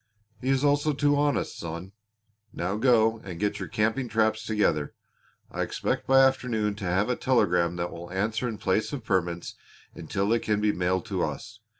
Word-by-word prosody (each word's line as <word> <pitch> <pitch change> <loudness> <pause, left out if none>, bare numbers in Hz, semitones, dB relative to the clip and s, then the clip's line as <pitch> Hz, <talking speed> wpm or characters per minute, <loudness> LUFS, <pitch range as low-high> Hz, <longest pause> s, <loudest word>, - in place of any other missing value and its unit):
"He 130 - -2
is 135 0 +2
also 145 +1 +2
too 145 +1 +2
honest, 145 0 0
son. 85 +3 -6 0.6
Now 90 +3 -2
go 115 -1 +3
and 90 -6 -8
get 105 0 -1
your - - -4
camping 110 +4 0
traps 110 0 +1
together. 105 -10 0 0.6
I - - -3
expect - - -2
by 135 0 +6
afternoon 120 -5 0
to 100 - -5
have 95 +4 +1
a 125 - 0
telegram 90 -10 +2
that 85 0 -3
will 85 +1 -8
answer 105 +6 -1
in 110 -3 -4
place 95 +3 0
of 135 -5 -4
permits 85 -4 -1 0.4
until 100 0 -2
they 115 +1 +3
can 105 -2 0
be 105 0 +2
mailed 90 +2 -1
to 95 -5 -2
us. 110 -1 -5
110 Hz, 185 wpm, -27 LUFS, 95-125 Hz, 0.6 s, by